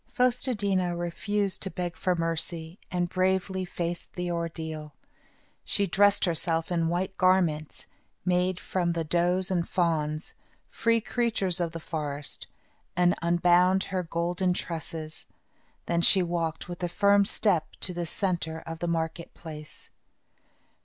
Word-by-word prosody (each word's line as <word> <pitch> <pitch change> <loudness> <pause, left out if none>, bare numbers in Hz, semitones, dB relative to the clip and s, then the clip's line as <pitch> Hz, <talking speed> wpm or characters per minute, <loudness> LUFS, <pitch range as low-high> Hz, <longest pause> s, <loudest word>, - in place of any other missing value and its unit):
Fos 250 -1 +2
te 255 -2 +2
di' 200 -2 0
na 180 -1 +1
refused 190 +4 -1
to 190 - -2
beg 175 -2 -4
for 180 +2 0
mercy 165 +1 -2
and 175 -1 0
bravely 190 +1 0
faced 175 -1 -4
the 180 -1 -2
ordeal. 160 -3 -4 0.7
She 200 - +1
dressed 200 +2 +4
herself 165 -1 0
in 165 -2 +1
white 175 +3 -1
garments, 175 -5 +2 0.4
made 180 0 +2
from 175 -2 -1
the 165 -1 -1
does 175 +4 +2
and 175 -2 0
fawns 155 -3 0 0.4
free 230 0 +2
creatures 215 -7 0
of 170 -2 0
the 165 - -6
forest 150 -3 -4 0.5
and 175 0 +4
unbound 175 +2 +4
her 185 - +1
golden 175 +2 0
tresses. 160 -2 -5 0.6
Then 170 0 +1
she 185 +2 +6
walked 170 -2 -2
with 175 0 -7
a 175 - -1
firm 200 +2 +4
step 185 -5 +1
to 180 - +2
the 175 -1 -3
centre 170 -4 -2
of 165 0 -6
the 175 - -2
market 165 0 -2
place. 155 -2 -10
175 Hz, 145 wpm, -28 LUFS, 165-185 Hz, 0.7 s, she